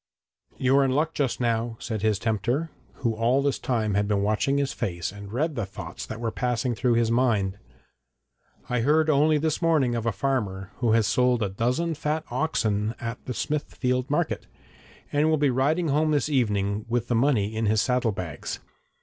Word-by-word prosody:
'You 130 +1 +2
are 140 - +5
in 135 - +2
luck 155 +5 +1
just 135 -4 -1
now,' 115 -1 0
said 110 -4 -4
his 110 -1 +2
tempter, 120 - -1 0.3
who 115 -2 +2
all 120 +5 +2
this 140 -1 0
time 110 -5 0
had 100 +1 +1
been 100 -1 +1
watching 110 +7 +1
his 140 -1 0
face 85 -3 -3
and 100 0 -10
read 150 +7 0
the 115 -5 -2
thoughts 90 -2 -7
that 110 - -6
were 115 -1 -2
passing 125 +1 -1
through 120 +1 +1
his 115 -1 +2
mind. 105 -5 +1 1.1
'I 125 - 0
heard 155 +5 +3
only 150 +2 +4
this 155 +2 -1
morning 155 -7 +3
of 115 -1 -2
a - - +3
farmer 100 -4 -2
who 120 -3 +2
has 115 -1 +4
sold 125 +3 +2
a 100 - -1
dozen 125 - 0
fat 155 +1 -2
oxen 115 -6 0
at 115 0 -5
the 125 - -3
Smithfield 130 -4 -1
Market, 160 +3 -1 0.7
and 150 +2 +3
will 155 - +3
be 145 -2 +2
riding 150 +6 +1
home 155 +3 +2
this 150 0 +1
evening 105 -6 0
with 120 0 0
the - - 0
money 115 -4 +2
in 110 0 0
his 110 +1 +3
saddle 125 0 +1
bags. 90 -7 -5
120 Hz, 190 wpm, -26 LUFS, 110-140 Hz, 1.1 s, are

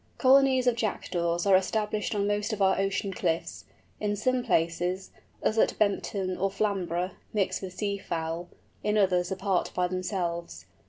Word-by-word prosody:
Colonies 265 -1 +5
of 245 -2 +3
Jackdaws 175 -6 -1
are 195 -1 +6
established 210 +2 0
on 200 -1 +1
most 205 +2 0
of 210 - -4
our 190 -1 +3
ocean 195 0 -1
cliffs, 160 - -2 0.3
in 205 0 0
some 250 +4 0
places, 175 -2 0 0.3
as 220 - +2
at - - +2
Bempton 195 -2 0
or 195 +1 +2
Flamborough, 190 -3 -1 0.2
mixed 205 -3 0
with 185 -2 -6
sea 200 -1 -2
fowl, 165 0 -4 0.3
in 210 +1 +1
others 185 -2 +2
apart 190 -1 0
by 180 0 +2
themselves. 180 -2 -3
195 Hz, 155 wpm, -28 LUFS, 180-210 Hz, 0.3 s, are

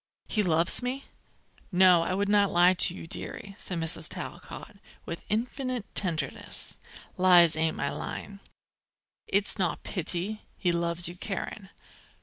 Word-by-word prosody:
He 215 - 0
loves 170 +1 +4
me?" 255 +3 -3 0.7
"No, 180 -2 +6
I 180 +2 -1
wouldn't 200 0 +2
lie 175 +1 +5
to 175 -1 +5
you, - - -8
dearie," 195 +3 -6
said 180 - -3
Mrs. 165 -1 -1
Talcott, - - -8 0.3
with 170 - -6
infinite 245 +1 -2
tenderness; 160 -8 0 0.4
"lies 175 -3 +6
ain't 160 0 0
my - - -2
line. 200 -1 -7 0.9
It's 200 +2 -1
not 180 -3 -1
pity. 185 +4 -3 0.2
He 180 - +1
loves 170 0 +1
you, 175 - -6
Karen." 195 +1 -6
185 Hz, 130 wpm, -28 LUFS, 170-205 Hz, 0.9 s, No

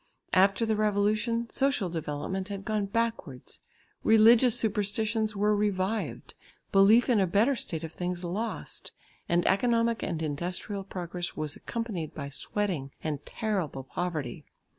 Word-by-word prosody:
After 195 +4 +4
the 220 -1 +1
Revolution, 215 +3 +1
social 270 -8 +1
development 165 +3 -3
had 200 -1 -6
gone 210 -1 0
backwards; 225 - -3 0.4
religious 225 +2 +6
superstitions 215 +1 0
were 210 +1 +2
revived, 205 +1 -1 0.4
belief 200 +5 +6
in 240 -5 +3
a 190 - +3
better 215 +10 +3
state 165 -8 -3
of 160 0 -6
things 180 0 -3
lost, 200 +7 -4 0.4
and 170 0 +2
economic 230 +2 +2
and 165 -3 -2
industrial 175 +6 -3
progress 175 -2 -5
was 155 -1 -3
accompanied 215 -9 -4
by 140 - -5
sweating 165 -1 -2
and 150 -2 -3
terrible 190 - -2
poverty. 155 -4 -4
200 Hz, 130 wpm, -28 LUFS, 175-220 Hz, 0.4 s, religious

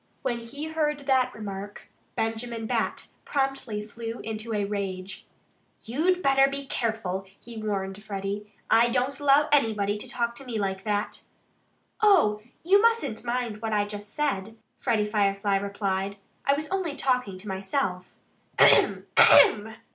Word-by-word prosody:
"When 240 -3 -1
he 270 +6 -7
heard 300 -2 -1
that 260 -2 +2
remark 205 -2 -8 0.3
Benjamin 225 0 -2
Bat - - -2
promptly 270 -7 -2
flew 230 +2 -6
into 220 +1 -5
a 205 -2 0
rage. 195 -2 -5 0.6
"You'd 340 +10 0
better 270 0 +5
be 280 0 -5
careful!" 220 -7 -2
he 230 -2 -9
warned 200 -1 -3
Freddie. 205 0 -5 0.2
"I 235 +1 +5
don't 255 +4 -1
allow 290 +1 +4
anybody 210 -7 +2
to - - -9
talk 235 -1 -1
to 275 - -8
me 245 -4 -4
like 195 -1 -2
that." 205 -1 -2 0.8
"Oh! 340 - +4 0.2
You 390 +4 +5
mustn't 455 - +1
mind 240 -3 -2
what 225 -1 -2
I 205 -1 +2
just 205 0 -8
said," 225 -8 -2 0.2
Freddie 225 -5 +1
Firefly 200 -1 +1
replied. 200 0 -2 0.3
"I 275 - +5
was 305 +2 -4
only 370 -6 -2
talking 250 -9 0
to 195 +3 -11
myself 190 -1 -2 0.5
AHEM - - +5
AHEM!" 220 +1 +6
225 Hz, 145 wpm, -26 LUFS, 205-270 Hz, 0.8 s, AHEM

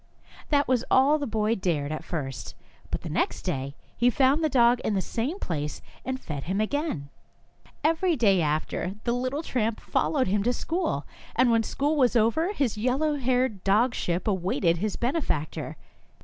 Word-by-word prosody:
That 285 -1 +3
was 250 -2 +2
all 280 +4 +5
the 285 - -2
boy 215 0 +1
dared 165 -8 -1
at 155 - -4
first, 135 -7 -5 0.3
but - - -3
the - - -7
next - - -1
day 140 -5 -3 0.2
he 245 - +3
found 275 +4 +3
the 310 - +3
dog 240 -2 +4
in 215 - -1
the - - +2
same 245 - -2
place 150 - -3 0.2
and 260 0 -3
fed 145 - -6
him 190 +4 -1
again. 215 - -1 0.7
Every 330 +3 +2
day 200 - +3
after 155 +3 -1
that 205 +4 -8
the 235 - 0
little 255 +5 -2
tramp 230 -6 -1
followed 275 -4 +1
him 200 +2 +1
to 245 +4 +1
school, 345 +8 -2 0.3
and 255 -2 +4
when 230 -1 +4
school 290 +7 -1
was 250 -3 +3
over 235 - +2
his 260 - -1
yellow 265 +7 +1
haired 250 -6 0
dogship 195 -4 +1
awaited 185 -3 +1
his 205 +3 -2
benefactor. 240 - -2
235 Hz, 175 wpm, -27 LUFS, 185-270 Hz, 0.7 s, all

